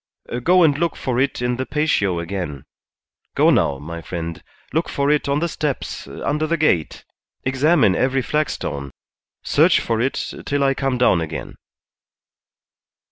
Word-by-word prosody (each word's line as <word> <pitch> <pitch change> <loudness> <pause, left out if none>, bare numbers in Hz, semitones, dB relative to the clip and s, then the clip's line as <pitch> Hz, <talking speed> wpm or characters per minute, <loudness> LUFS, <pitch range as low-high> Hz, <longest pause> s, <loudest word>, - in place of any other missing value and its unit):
"Go 180 +6 +5
and 150 -3 +4
look 170 -1 0
for 125 -2 -2
it 135 -2 0
in 125 0 0
the 130 - -2
patio 125 - +1
again. 85 -5 -5 0.7
Go - - +5
now, 70 - +2
my 85 +4 -7
friend; 85 -1 -5 0.3
look 160 +2 0
for 140 +1 +1
it 150 -1 +1
on 140 +2 +1
the 170 - +1
steps, 150 -4 -3
under 150 +2 -2
the 170 +1 0
gate; 90 - 0 0.4
examine 130 - +3
every 130 +3 +1
flagstone; 115 - -2 0.5
search - - +4
for 115 -1 -1
it 130 +3 -2
till 145 -1 +1
I 135 0 +3
come 135 -1 -1
down 110 -8 +3
again. 80 -1 -5
130 Hz, 150 wpm, -21 LUFS, 90-150 Hz, 0.7 s, Go